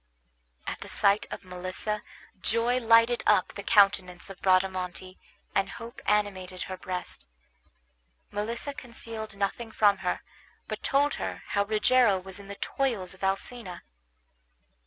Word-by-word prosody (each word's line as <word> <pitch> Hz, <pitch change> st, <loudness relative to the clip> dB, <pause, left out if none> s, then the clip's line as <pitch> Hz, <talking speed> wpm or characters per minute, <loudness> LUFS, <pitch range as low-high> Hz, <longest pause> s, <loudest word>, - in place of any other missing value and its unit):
At -, -, -4 dB
the -, -, -8 dB
sight 200 Hz, +1 st, +3 dB
of -, -, -7 dB
Melissa 185 Hz, +4 st, -3 dB, 0.4 s
joy 235 Hz, +2 st, +2 dB
lighted 230 Hz, 0 st, +5 dB
up -, -, +5 dB
the -, -, -6 dB
countenance 195 Hz, -3 st, +3 dB
of 195 Hz, -, -12 dB
Bradamante, 185 Hz, -1 st, +1 dB, 0.3 s
and 195 Hz, 0 st, +2 dB
hope 235 Hz, +2 st, -9 dB
animated 190 Hz, -3 st, 0 dB
her 185 Hz, -, -5 dB
breast. 180 Hz, -, -5 dB, 1.0 s
Melissa 230 Hz, +7 st, -2 dB
concealed 225 Hz, -5 st, -7 dB
nothing 215 Hz, +3 st, -2 dB
from 205 Hz, -3 st, +4 dB
her, -, -, -1 dB, 0.5 s
but -, -, -4 dB
told 285 Hz, +2 st, +2 dB
her -, -, -4 dB
how 200 Hz, 0 st, +2 dB
Rogero 220 Hz, 0 st, +4 dB
was 190 Hz, +1 st, -7 dB
in 200 Hz, -, -11 dB
the 200 Hz, -, -6 dB
toils 215 Hz, -8 st, -1 dB
of 190 Hz, -, -13 dB
Alcina. 195 Hz, 0 st, -2 dB
200 Hz, 135 wpm, -28 LUFS, 185-230 Hz, 1.0 s, lighted